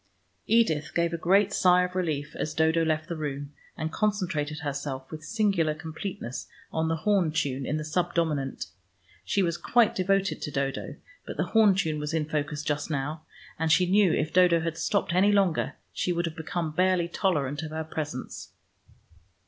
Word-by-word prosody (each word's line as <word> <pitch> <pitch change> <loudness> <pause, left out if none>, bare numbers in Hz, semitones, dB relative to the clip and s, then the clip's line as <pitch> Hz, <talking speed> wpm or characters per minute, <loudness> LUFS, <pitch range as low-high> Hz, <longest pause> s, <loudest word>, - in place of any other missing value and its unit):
Edith 165 -10 +2
gave 170 0 +1
a - - +1
great 195 +4 +3
sigh 180 -1 +5
of 180 0 -3
relief 150 -5 -2
as 155 - -3
Dodo 160 +1 +3
left 155 -1 0
the 170 - -4
room, 145 -2 -5 0.2
and 160 -1 -3
concentrated 175 -8 -1
herself 140 -2 -4
with 155 -1 -7
singular 195 -5 +1
completeness 155 - -6 0.3
on 160 0 0
the 165 - +1
horn 180 -1 +2
tune 140 -4 -1
in 150 - 0
the 155 - -3
subdominant. 160 -4 -1 0.6
She 200 - +1
was 170 -1 0
quite 240 -3 +3
devoted 195 +1 +1
to - - -3
Dodo, 140 0 -3 0.3
but - - -6
the - - +1
horn 215 -4 +6
tune 160 -6 0
was 150 +2 -3
in 155 -2 0
focus 150 -1 -2
just 150 0 -2
now, 150 +1 -2 0.4
and 160 -1 +1
she 180 +3 +5
knew 190 0 +4
if 155 - -1
Dodo 175 -2 +5
had 165 0 -2
stopped 195 0 0
any 195 +3 +4
longer, 195 -5 +2 0.2
she 180 - -1
would 175 0 0
have 165 -1 -4
become 160 0 -3
barely 180 +1 +2
tolerant 150 -6 0
of 160 - -5
her 160 +1 -3
presence. 150 -4 -6
160 Hz, 180 wpm, -27 LUFS, 150-180 Hz, 0.6 s, horn